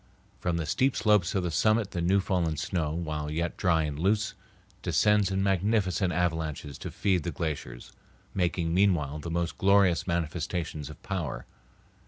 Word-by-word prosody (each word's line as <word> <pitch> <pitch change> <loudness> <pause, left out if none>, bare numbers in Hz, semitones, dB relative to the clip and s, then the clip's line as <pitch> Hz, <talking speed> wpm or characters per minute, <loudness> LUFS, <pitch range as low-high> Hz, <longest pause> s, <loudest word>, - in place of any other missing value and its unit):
From 85 -1 -1
the 80 - -2
steep 130 - +1
slopes 105 -5 +3
of 95 - +1
the 90 - -1
summit 110 +4 +2
the 85 - -2
new 95 +4 +3
fallen 90 -5 0
snow, 80 -1 -1
while 80 -2 -3
yet 85 +3 -2
dry 85 -4 +2
and 75 -1 -4
loose, 105 +5 +1 0.5
descends 105 -2 +3
in 95 0 0
magnificent 95 -1 +1
avalanches 80 -4 -2
to - - -5
feed 95 -3 +1
the 85 - -3
glaciers, 75 -8 -5 0.4
making 85 -2 0
meanwhile 85 -6 +2
the 85 - -6
most 85 0 -2
glorious 100 -3 +4
manifestations 80 -2 -2
of 75 - -11
power. 75 -11 -3
85 Hz, 160 wpm, -28 LUFS, 80-95 Hz, 0.5 s, glorious